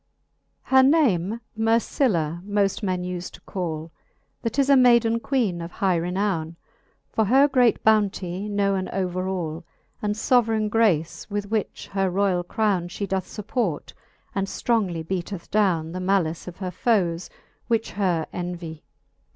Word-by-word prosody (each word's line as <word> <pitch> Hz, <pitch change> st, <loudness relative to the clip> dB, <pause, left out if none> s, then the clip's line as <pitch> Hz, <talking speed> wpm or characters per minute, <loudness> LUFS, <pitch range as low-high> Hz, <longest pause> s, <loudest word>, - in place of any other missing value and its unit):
XVII. 265 Hz, -, -1 dB
Her -, -, +9 dB
name 235 Hz, -, +3 dB
Mer 225 Hz, +1 st, +3 dB
cilia 170 Hz, -, 0 dB
moft 200 Hz, 0 st, 0 dB
men 185 Hz, -3 st, -1 dB
ufe 180 Hz, -1 st, -4 dB
to -, -, -13 dB
call; 165 Hz, -4 st, -4 dB, 0.5 s
That 230 Hz, +3 st, -3 dB
is 275 Hz, -1 st, +3 dB
a 280 Hz, -, +6 dB
mayden 235 Hz, -3 st, +5 dB
Queene 230 Hz, -10 st, 0 dB
of 170 Hz, +1 st, -7 dB
high 190 Hz, -2 st, +1 dB
renowne. 175 Hz, -2 st, -1 dB, 0.6 s
For 220 Hz, -, +1 dB
her 265 Hz, +7 st, +5 dB
great 250 Hz, -4 st, +3 dB
bounty 200 Hz, -2 st, +1 dB
knowen 200 Hz, -2 st, 0 dB
over 185 Hz, -1 st, -2 dB
all, 170 Hz, -4 st, -3 dB, 0.4 s
And 210 Hz, 0 st, -1 dB
fbveraine 220 Hz, -2 st, +2 dB
grace, 185 Hz, -9 st, +1 dB
with 205 Hz, 0 st, -3 dB
which 220 Hz, -3 st, -2 dB
her 195 Hz, -1 st, 0 dB
royall 185 Hz, -1 st, +1 dB
crowne 195 Hz, -2 st, 0 dB
She 200 Hz, -, -4 dB
doth 190 Hz, -1 st, -2 dB
fupport, 210 Hz, -, -3 dB, 0.4 s
and 195 Hz, 0 st, -1 dB
ftrongly 190 Hz, -9 st, -1 dB
beateth 185 Hz, 0 st, -4 dB
downe 175 Hz, -7 st, +2 dB
The 180 Hz, -, -5 dB
malice 185 Hz, -4 st, 0 dB
of 180 Hz, -, -8 dB
her 185 Hz, -2 st, -4 dB
foes^ 180 Hz, -4 st, 0 dB, 0.4 s
which 230 Hz, -2 st, 0 dB
her 180 Hz, -5 st, 0 dB
envy. 175 Hz, -3 st, -5 dB
195 Hz, 150 wpm, -24 LUFS, 175-220 Hz, 0.6 s, Her